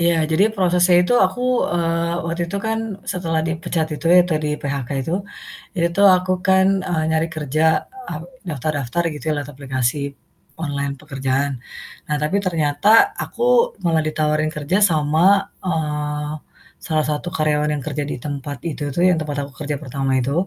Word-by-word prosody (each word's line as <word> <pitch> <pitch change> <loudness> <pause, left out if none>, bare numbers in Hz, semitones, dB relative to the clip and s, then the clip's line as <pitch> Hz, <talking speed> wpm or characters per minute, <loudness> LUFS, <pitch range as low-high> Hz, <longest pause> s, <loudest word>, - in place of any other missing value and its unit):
Iya, 170 0 +3 0.2
jadi 185 +6 +4
prosesnya 180 -2 +3
itu 245 +7 +1
aku, 215 +7 -7 0.3
eee, 170 0 0
waktu 170 +1 -3
itu 200 - -3
kan 225 0 0 0.3
setelah 165 -3 -1
dipecat 160 0 -1
itu 165 - -5
ya 180 - +9
tadi 155 -1 0 0.2
PHK 140 -3 -3
itu, 165 - -4 0.7
itu 170 +2 0 0.2
aku 185 +1 -2 0.2
kan, 190 0 +5 0.2
eee, 160 -3 0
nyari 160 +1 +1
kerja, 155 +1 -1 0.5
e - - -6 0.4
daftar-daftar 145 +1 -2
gitu 145 - -9
ya - - +2
lewat 145 0 -4
aplikasi 130 -1 -1 0.6
online 140 -2 -2
pekerjaan. 135 -1 -1 0.6
Nah 150 - 0
tapi 155 +6 +1
ternyata 160 0 0 0.4
aku - - -9 0.4
malah 165 -2 +2
ditawarin 155 0 0
kerja 150 +5 0
sama, 160 +6 +3 0.2
eee, 150 -3 -2 0.5
salah 155 -2 +1
satu 150 +3 -2
karyawan 150 -1 +1
yang 140 - -6
kerja 145 -1 -2
di - - -3
tempat 145 -1 -4
itu 150 -1 -5
tuh 175 - +2
yang 180 - +3
tempat 150 -2 -4
aku - - -15
kerja 150 -1 -2
pertama 135 0 -3
itu, 130 +2 -1
155 Hz, 160 wpm, -20 LUFS, 145-170 Hz, 0.7 s, ya